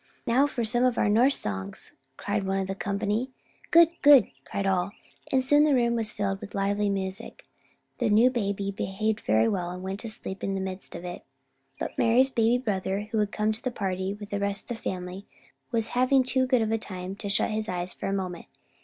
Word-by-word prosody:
"Now 260 +5 +3
for 240 -5 -2
some 240 +3 +3
of 250 -2 +2
our 205 - +2
Norse 245 +7 +4
songs," 95 -1 -5 0.3
cried 205 0 -2
one 195 0 -1
of 195 - 0
the 190 - -3
company. 205 +5 -2 0.4
"Good, 335 -1 +7
good," 285 -7 +7
cried 200 - -3
all, 190 +1 0 0.4
and 260 -1 +3
soon 290 +3 +5
the 300 -2 +4
room 235 -1 +2
was 225 -2 -1
filled 195 -1 -2
with - - -9
lively 200 +1 +1
music. 195 +2 -4 0.5
The 240 -3 +1
new 225 +5 +5
baby 200 -4 -2
behaved 210 +3 -2
very 110 - +2
well, 180 -3 -1
and 180 +1 -7
went 190 +1 -4
to 230 - -5
sleep 195 -2 -6
in 195 - -1
the - - -2
midst 190 0 -6
of 175 - -7
it. 175 0 -7 0.6
But - - -4
Mari's 250 +4 +4
baby 230 0 +3
brother, 205 -3 -2
who 220 - +1
had 210 -1 0
come 215 0 0
to 220 - -5
the 255 - -1
party 190 -3 -3
with 205 -1 -10
the 200 - -1
rest 200 +2 -1
of - - -1
the - - -19
family, 185 +1 -5 0.4
was 230 -2 -1
having 255 +2 +3
too 260 0 +1
good 255 -3 +3
a 220 +1 0
time 185 -2 -6
to 200 - -5
shut 200 - +1
his 215 0 -2
eyes 180 0 -3
for - - -5
a - - -1
moment. 185 -3 -4
205 Hz, 220 wpm, -27 LUFS, 195-235 Hz, 0.6 s, Good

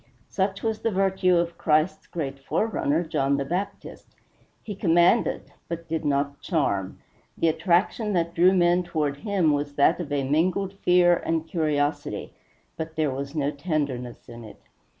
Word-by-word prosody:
Such 195 0 -2
was 220 -1 -1
the 230 - +1
virtue 190 -2 +2
of 170 0 -1
Christ's 155 +1 +1
great 140 -5 -5
forerunner, 160 0 0
John 140 -3 0
the 140 - -2
Baptist. 180 +7 -5 0.5
He 210 - -5
commanded, 175 +3 +2
but 170 0 -6
did 160 -1 -3
not 140 0 -1
charm; 100 - -1 0.4
the 165 - +2
attraction 190 +6 +1
that 170 -2 0
drew 175 +2 +5
men 175 -1 +3
toward 155 -5 -2
him 190 -5 +1
was 145 0 -2
that 145 +5 +3
of 170 -5 -5
mingled 160 +8 0
fear 175 -1 +4
and 165 0 -2
curiosity, 145 - -1 0.4
but 160 0 -5
there 155 -3 +1
was 140 +3 -5
no 145 -1 0
tenderness 140 -6 -3
in 120 0 -10
it. 110 - -13
165 Hz, 150 wpm, -25 LUFS, 145-180 Hz, 0.5 s, drew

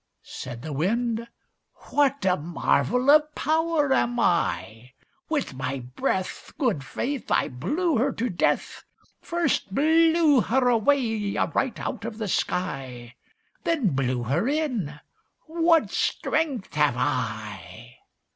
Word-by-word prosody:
Said 120 -2 -8
the 155 - -5
Wind 230 - -1 0.6
"What 280 -6 +2
a 185 -1 +4
marvel 175 - +1
of 300 0 +4
power 315 -2 +1
am 245 -2 +1
I! 125 - 0 0.4
With 295 - -1
my 130 +1 -3 0.2
breath, 185 -1 -2
Good 230 - 0
faith! 265 - -4
I - - +2
blew 295 - -1
her 265 +5 +2
to 240 - -2
death 180 -7 -1 0.4
First 310 - -1
blew 320 -2 +4
her 250 +3 +1
away 225 -3 +1
right 260 -5 0
out - - -4
of 225 -1 -5
the 220 -2 -3
sky 130 -11 -3 0.5
Then 295 - +1
blew 130 -4 -1
her 145 - 0
in; 245 - -2 0.5
what 330 0 +2
strength 290 -10 -1
have 150 -4 +2
I!" 110 -3 -4
225 Hz, 120 wpm, -25 LUFS, -, 0.6 s, a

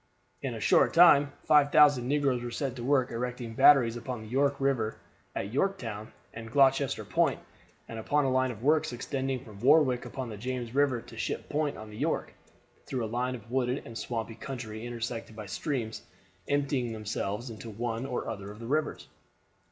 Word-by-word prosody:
In - - -3
a - - -6
short - - +3
time 145 -5 +7
5,000 145 -4 +5
negroes 140 -3 +1
were 120 - -4
set 130 +1 -3
to 120 - -6
work 130 -1 +2
erecting 120 0 -4
batteries 120 -2 +6
upon 120 0 -5
the - - -10
York 140 +3 +2
River 135 -5 0 0.4
at 100 +3 -4
Yorktown 115 - -2 0.2
and 115 0 -8
Gloucester 135 0 +3
Point, - - +1 0.5
and 115 - -6
upon 145 +6 +1
a 130 - +1
line 130 0 +2
of 115 -2 -8
works 150 -2 +2
extending 130 +1 -3
from 105 -3 -12
Warwick 130 -1 +4
upon 130 -3 -5
the 105 - -7
James 125 +1 -4
River 135 -4 +2
to 120 -2 -12
Ship - - -3
Point 150 -1 -1
on 110 0 -9
the 105 - -10
York, - - -1 0.5
through 125 -3 -2
a 110 +2 -5
line 125 +1 0
of 115 -1 -12
wooded 130 +1 0
and 115 - -9
swampy 115 -1 -4
country 115 -2 -6
intersected 115 -2 -5
by 110 -1 -7
streams 115 +1 -3 0.5
emptying 140 -4 0
themselves 110 +2 -4
into 110 +1 -8
one 115 +3 -3
or 125 - -3
other 100 -3 -5
of 105 - -10
the 115 - -8
rivers. 150 +5 -1
125 Hz, 185 wpm, -29 LUFS, 115-140 Hz, 0.5 s, time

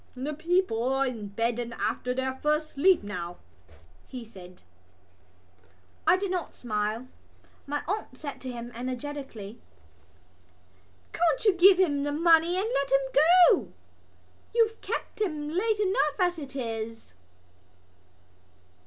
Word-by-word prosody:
"The 270 +4 -4
people 320 -7 0
are 270 0 +2
in 230 -5 -4
bed 230 +4 -1
and 235 -1 -5
after 250 - -2
their 260 +1 -1
first 300 +2 0
sleep 355 - +3
now," 175 -4 -5 0.7
he 250 -3 -8
said. 185 -4 -14 1.4
I 370 - +6
did 390 0 -3
not 360 -2 -3
smile. 215 +1 -2 0.6
My 290 +1 -2
aunt 390 -9 -3
said 285 -1 -7
to 260 - -5
him 240 0 -7
energetically: 250 -3 -6 1.5
"Can't 330 +1 +1
you 415 - +6
give 365 +1 +7
him 300 -7 +2
the 290 +1 -1
money 330 +3 +4
and 395 +3 0
let 275 -1 0
him 270 0 +2
go? 345 +5 +5 0.8
You've 450 -1 +2
kept - - -5
him 305 -7 -2
late 415 +6 0
enough 375 -7 +1
as 355 -2 +1
it 275 -2 -9
is." 225 - -5
280 Hz, 130 wpm, -27 LUFS, 240-345 Hz, 1.5 s, give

